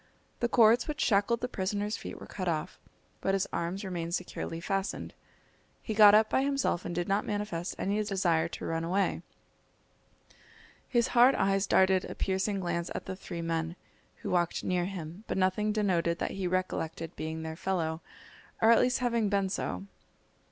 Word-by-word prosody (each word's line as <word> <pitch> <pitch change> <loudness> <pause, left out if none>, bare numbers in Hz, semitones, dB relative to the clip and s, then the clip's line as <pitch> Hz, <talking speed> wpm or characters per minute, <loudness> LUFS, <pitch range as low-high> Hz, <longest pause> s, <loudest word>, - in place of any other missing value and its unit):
The 240 - +1
cords 235 0 +5
which 300 -1 -4
shackled 215 +2 +2
the 250 - -1
prisoner's 205 0 -2
feet - - -7
were - - -9
cut 185 -2 -5
off, 160 -3 -2 0.4
but 195 - +1
his 195 - +1
arms 180 +4 -2
remained 170 -2 -2
securely 165 - -5
fastened. 195 +3 -3 0.7
He 220 - -4
got 210 -1 +8
up 215 0 +5
by 265 - +2
himself 275 -10 0
and 175 - -4
did 175 0 -1
not 200 +2 +1
manifest 205 -5 -3
any 205 +2 0
desire 175 -5 +1
to - - -7
run 165 0 -1
away. 190 +4 0 1.7
His 240 -2 +2
hard 250 +2 +6
eyes 195 0 +1
darted 190 -1 +4
a - - -7
piercing 195 +1 -1
glance 170 -1 -2
at - - -4
the 190 - -5
three 175 -3 -6
men, 165 0 -2 0.5
who - - -3
walked 175 -1 +1
near 180 -1 0
him, 180 0 -7
but - - -2
nothing 190 +3 +1
denoted 180 -5 +1
that - - -2
he 190 -2 -2
recollected 170 -3 -2
being 160 +1 -4
their 160 0 -5
fellow, 165 -3 -2 0.6
or 225 - +6
at 230 - +6
least 250 +1 +1
having 230 -3 +1
been 195 -1 +1
so. 195 - -3
190 Hz, 175 wpm, -30 LUFS, 170-210 Hz, 1.7 s, got